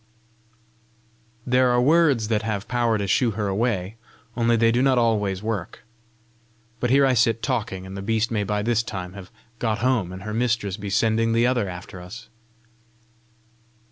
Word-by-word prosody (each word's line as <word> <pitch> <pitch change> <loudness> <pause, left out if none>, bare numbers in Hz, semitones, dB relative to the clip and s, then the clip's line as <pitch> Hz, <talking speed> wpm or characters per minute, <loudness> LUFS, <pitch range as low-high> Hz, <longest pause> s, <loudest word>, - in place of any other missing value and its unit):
There 125 0 +3
are 120 0 +3
words 140 -5 +3
that 110 -2 +1
have 105 -3 -3
power 120 -2 +1
to 100 - -2
shoo 115 +5 +2
her 105 -2 -1
away, 100 -1 -1 0.4
only 115 0 +2
they 115 0 +3
do 120 +2 +1
not 130 -1 +3
always 105 -5 +1
work 110 -5 -4 1.0
But 125 - 0
here 140 +2 +5
I 130 - +3
sit 115 -1 +2
talking, 105 -8 -2
and 95 +1 -8
the 95 - -5
beast 110 +2 0
may 105 -2 0
by 105 +1 -2
this 115 0 +1
time 95 -5 -6
have 95 -2 -10 0.3
got 110 -3 0
home, 115 -6 0
and 95 +1 -8
her 105 0 -5
mistress 110 -4 0
be 100 -1 -6
sending 115 +2 +1
the 115 +1 +3
other 120 -6 +1
after 90 +1 -9
us!" 115 +7 -11
110 Hz, 175 wpm, -23 LUFS, 100-120 Hz, 1.0 s, here